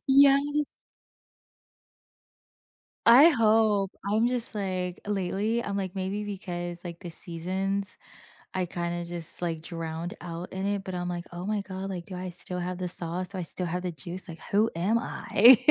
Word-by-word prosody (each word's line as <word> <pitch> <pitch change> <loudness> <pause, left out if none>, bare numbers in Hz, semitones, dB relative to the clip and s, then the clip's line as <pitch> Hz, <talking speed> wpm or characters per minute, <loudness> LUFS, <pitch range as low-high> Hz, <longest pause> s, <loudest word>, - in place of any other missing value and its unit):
Yes. 280 +2 +4 2.3
I 260 +8 +9
hope. 215 - +3 0.2
I'm 220 +3 +3
just, 245 -3 0
like, 185 -3 -3
lately, 205 +4 -1
I'm 200 0 -3
like, 190 -1 -3
maybe 195 +2 -3
because, 175 -4 -5
like, 170 -1 -7
the 175 -3 -7
seasons, 190 +4 -3 0.6
I 185 -1 0
kinda 175 0 -3
just, 170 0 -3
like, 165 -2 -2
drowned 165 +1 -5
out 175 +1 -7
in 190 +1 -3
it, 200 -1 -1
but 185 -1 -5
I'm, 180 0 -3
like, 175 0 -4
"Oh 175 +2 -6
my 210 -1 -1
god, 190 0 -6
like, 175 -3 -5
do 185 - -8
I 180 0 -5
still 180 +1 -3
have 180 +1 -4
the 180 -1 -3
sauce, 175 +1 +4
do 195 - -1
I - - -2
still 180 +2 +7
have 180 +2 -3
the 180 - -2
juice? 170 +5 -5
Like, 165 - -9
who 215 +3 +3
am 190 +7 +1
I?" 235 +1 +5
185 Hz, 170 wpm, -27 LUFS, 175-205 Hz, 2.3 s, I